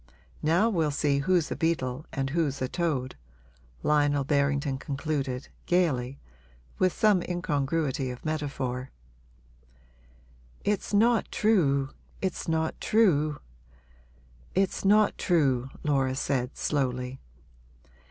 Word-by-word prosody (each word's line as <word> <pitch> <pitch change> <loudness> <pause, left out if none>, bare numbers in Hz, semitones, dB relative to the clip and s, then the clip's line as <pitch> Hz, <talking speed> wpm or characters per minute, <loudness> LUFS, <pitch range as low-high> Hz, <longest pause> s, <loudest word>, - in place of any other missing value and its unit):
Now 170 +8 +3
we'll 165 -9 +1
see 145 -1 +1
who's 170 +2 +1
a - - -1
beetle 150 -4 -1
and 135 0 -2
who's 150 -4 0
a 130 - -1
toad!' 140 -6 -2 0.7
Lionel 145 -1 +3
Berrington 140 -1 +1
concluded, 140 -3 -3 0.2
gaily, 140 -8 +1 0.6
with 185 -1 +3
some 210 -2 +3
incongruity 145 -5 -1
of 125 +3 -8
metaphor. 135 -4 -3 1.7
'It's 210 -1 -1
not 225 +3 +3
true 140 -11 +2 0.3
it's 190 -2 -3
not 160 -1 -1
true 155 -9 +2 1.1
it's 190 0 +1
not 210 +1 +4
true,' 135 -7 +2
Laura 135 -3 +1
said, 130 -2 -1
slowly. 130 -2 -1
145 Hz, 105 wpm, -28 LUFS, 135-170 Hz, 1.7 s, not